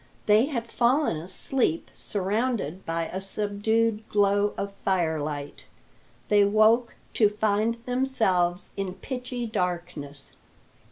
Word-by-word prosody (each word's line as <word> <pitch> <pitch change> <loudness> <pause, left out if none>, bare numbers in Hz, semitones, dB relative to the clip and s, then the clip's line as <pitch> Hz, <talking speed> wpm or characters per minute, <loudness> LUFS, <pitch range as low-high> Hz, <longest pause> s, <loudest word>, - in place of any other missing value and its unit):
They 215 +5 +5
had 235 -6 -4
fallen 250 - +2
asleep 180 +3 -1
surrounded 205 - -2
by 165 0 -1
a 190 +3 -5
subdued 215 +2 0
glow 205 0 +2
of 200 0 -3
firelight; 155 -6 -1 0.6
they 205 -1 +5
woke 215 +4 +3 0.2
to 215 -3 +4
find 215 +2 +1
themselves 220 -9 +1
in 190 -2 -3
pitchy 250 +2 -5
darkness. 175 -8 -4
205 Hz, 105 wpm, -26 LUFS, 180-230 Hz, 0.6 s, They